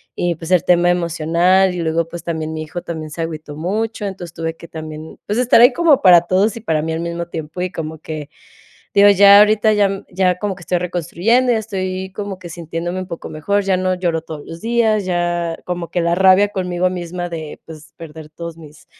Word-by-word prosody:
Y, 175 -1 -1
pues, 165 +2 -8
el 180 -2 +4
tema 175 0 +4
emocional. 175 +2 +2
Y - - -4
luego, 165 0 0
pues, 170 - -8
también 160 -2 -3
mi 155 - -4
hijo 170 +3 -6
también 160 -2 -6
se 165 - -5
agüitó 155 -2 -6
mucho. 210 +6 -2
Entonces 180 -4 -6
tuve 165 0 -4
que 170 - -12
también, 155 0 -9
pues, 210 +3 -1
estar 250 -2 +4
ahí 245 +2 +7
como 320 -2 +3
para 175 -2 +7
todos 190 +5 +1
y 230 - -8
para 160 -8 0
mí 160 +1 -3
al 160 - -3
mismo 170 0 -4
tiempo. 160 +1 -7
Y 185 - -1
como 160 -1 -6
que 155 -2 -7 0.7
digo 200 0 +7
ya 200 0 +8
ahorita 215 +1 +4
ya, 205 -1 +3
mm, 195 0 -5
ya 180 -1 +1
como 200 -1 -3
que - - -15
estoy 180 - -1
reconstruyendo. 180 +8 +1
Ya 225 - +2
estoy 190 -3 -4
como 200 -2 -5
que 175 -2 -10
sintiéndome 170 +2 -5
un 185 - -6
poco 170 - -7
mejor. 200 +7 -1
Ya 190 -1 +2
no 185 0 0
lloro 175 -3 -1
todos 155 -2 -8
los 165 0 -9
días, 225 -3 +1
ya 175 -2 -1
como 175 -1 -4
que 175 - -1
la 170 0 +1
rabia 190 +2 +5
conmigo 180 -2 -1
misma 175 0 -5
de, 160 -3 -7
pues, 160 0 -13
perder 160 -1 -10
todos 170 +1 -8
mis 150 -1 -15
175 Hz, 220 wpm, -18 LUFS, 165-190 Hz, 0.7 s, ya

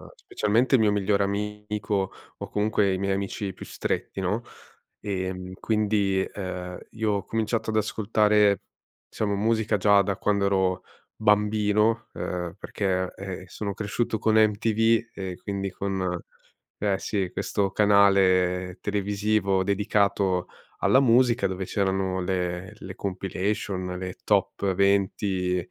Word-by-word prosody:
specialmente 115 +6 +1
il 120 - +4
mio 105 -1 +4
migliore 100 0 +2
amico, 105 -1 -2 0.3
o - - -7
comunque 105 -2 +1
i - - -1
miei 100 +1 0
amici 100 0 -3
più - - -10
stretti, 95 - -3
no? 100 +5 0 0.6
Ehm, 95 -2 -4
quindi, 105 -3 +1
uhm, 90 -2 -5
io 110 -1 -1
ho 100 -2 -1
cominciato 110 0 -1
ad - - -3
ascoltare, 105 -1 +2 0.5
diciamo 100 -2 -1
musica, 110 +1 +1
già 100 0 +5
da 100 0 -1
quando 100 -1 +1
ero 95 -2 +1 0.3
bambino, 105 +1 +2
uhm, 90 -2 -4
perché, 95 -2 -2
ehm, 95 -1 -6
sono 100 +2 -4
cresciuto 110 +2 -2
con 110 +1 +1
MTV 110 +2 +3
e 95 -2 -5
quindi 100 -1 -3
con 95 -1 -2 0.6
eh, 100 -2 0
sì 95 -3 -2
questo 100 -1 -1
canale 95 -3 +3
televisivo 100 -1 0
dedicato 100 -2 +1 0.3
alla 130 - +4
musica 120 -4 +4
dove 95 0 -3
c'erano 95 -1 0
le 90 +1 -2
le 95 -1 -9
compilation, 95 -1 -3
le 90 0 -5
top 100 -1 +1
20 95 -1 +1
100 Hz, 125 wpm, -26 LUFS, 95-105 Hz, 0.6 s, già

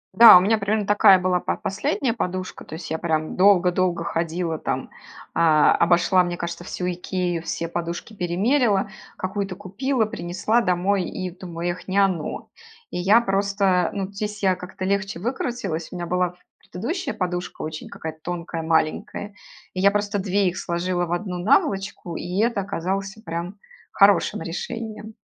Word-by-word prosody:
Да, 230 -3 +11
у - - +7
меня 210 +5 +2
примерно 205 0 -1
такая 200 -2 +6
была 180 -1 +1
по - - -2
последняя 250 +4 -1
подушка. 185 -4 -4
То - - -9
есть 160 +1 -8
я 160 - -1
прям 155 -2 -1
долго-долго 180 -2 +3
ходила, 165 0 -2
там, - - -3 0.4
а, 155 -2 +5
обошла, 175 +2 +4
мне 175 -1 -3
кажется, 170 0 -5
всю 180 0 -3
"Икею", 180 -1 -2
все 170 - -3
подушки 170 +5 -5
перемерила. 200 +3 +1 0.3
Какую-то 195 0 -3
купила, 220 +5 -1
принесла 195 +5 0
домой 185 0 +1
и 185 +1 -4
думаю: 175 -1 -4
"Эх, 180 - -9
не 190 - 0
оно". 190 -6 0 0.4
И - - -4
я 195 +6 +5
просто, 195 -4 +1
ну, 195 -2 -2
здесь 210 +1 -5
я 190 -2 +3
как-то 185 +1 -7
легче 195 -2 -1
выкрутилась. 210 -7 -3
У - - -7
меня 175 -1 -4
была 180 0 0 0.2
предыдущая 320 - -4
подушка, 180 -1 -3
очень 155 0 -6
какая-то 160 0 -7
тонкая, 170 -1 -4
маленькая, 160 +5 -1 0.4
и 185 - -2
я 200 - +6
просто 205 0 -1
две 195 0 +1
их 180 +1 -2
сложила 175 0 -1
в 170 - -7
одну 180 0 -2
наволочку, 195 -2 +1
и 180 +3 -4
это 230 -3 +1
оказалось 195 +1 -3
прям 170 +4 -5 0.3
хорошим 200 -4 +4
решением. 215 +5 -6
185 Hz, 160 wpm, -23 LUFS, 175-200 Hz, 0.4 s, Да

